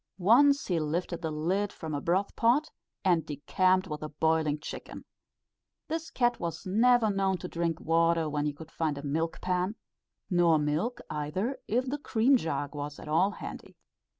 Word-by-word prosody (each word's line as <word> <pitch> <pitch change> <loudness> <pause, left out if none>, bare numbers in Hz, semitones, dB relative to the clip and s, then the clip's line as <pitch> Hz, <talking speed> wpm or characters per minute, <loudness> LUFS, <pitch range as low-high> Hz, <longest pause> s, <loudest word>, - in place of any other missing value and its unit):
Once 275 +9 +5
he 175 -3 0
lifted 170 +3 -2
the 160 - -2
lid 180 +7 -1
from 160 -1 -6
a 145 - -2
broth 185 +6 0
pot, 260 +7 +2 0.3
and 175 -4 +3
decamped 185 +6 +1
with 150 -3 -5
the 155 - -6
boiling 155 0 +1
chicken. 150 - -8 0.8
This 325 +1 -3
cat 240 -1 +1
was 170 +2 -4
never 225 +3 +4
known 195 -1 +1
to 180 - -6
drink 170 -1 -2
water 165 0 +2
when 150 0 -1
he - - 0
could 155 +2 -12
find 155 -3 -1
a 140 - -7
milk 160 +3 -2
pan; 180 +3 0 0.5
nor 175 -3 +4
milk, 155 +11 -1
either, 160 - -2
if 245 +4 +1
the 285 +3 -3
cream 255 0 +3
jug 145 - -2
was 145 0 -5
at - - -10
all 165 +6 +3
handy. - - -9
170 Hz, 175 wpm, -29 LUFS, 155-205 Hz, 0.8 s, Once